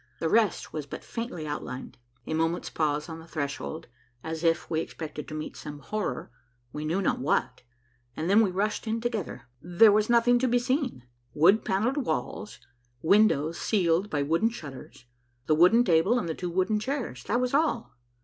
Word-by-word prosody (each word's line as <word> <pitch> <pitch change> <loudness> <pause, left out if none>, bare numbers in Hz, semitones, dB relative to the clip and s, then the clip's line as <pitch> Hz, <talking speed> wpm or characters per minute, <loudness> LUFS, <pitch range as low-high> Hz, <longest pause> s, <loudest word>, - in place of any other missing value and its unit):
The 160 - -1
rest 220 -2 +1
was 150 -2 -4
but - - -8
faintly 230 -9 -5
outlined. 145 -3 -6 0.3
A - - -3
moment's 165 +2 -1
pause 150 -1 0
on 165 -1 -7
the 165 - -13
threshold, 140 - -4 0.4
as 160 +1 -5
if 165 0 +2
we 160 - -1
expected 155 -2 -7
to 155 - -6
meet 155 - -5
some 150 -1 -8
horror, 145 -4 -4 0.4
we 150 +1 -4
knew 175 +6 0
not - - +1
what, 140 +4 0 0.6
and 160 - -2
then 200 +4 +6
we 210 - +3
rushed 205 +5 -2
in 225 +1 0
together. 225 -6 -3 0.2
There 180 +6 +5
was 215 +2 +2
nothing 240 +1 +4
to 260 - +1
be 245 0 +3
seen. 255 - -1 0.3
Wood 185 +8 +5
panelled 220 +9 0
walls; 250 -5 -3 0.5
windows 170 -4 +3
sealed 185 -1 +1
by 145 -2 0
wooden 165 +10 +2
shutters; 140 - -10 0.4
the 155 - +3
wooden 180 +10 +6
table 185 +5 +3
and 240 - -2
the 160 - -1
two 180 +2 -4
wooden 185 +5 +1
chairs; 230 - -4
that 240 - +1
was 250 0 -1
all. 280 - 0
175 Hz, 180 wpm, -27 LUFS, 155-225 Hz, 0.6 s, then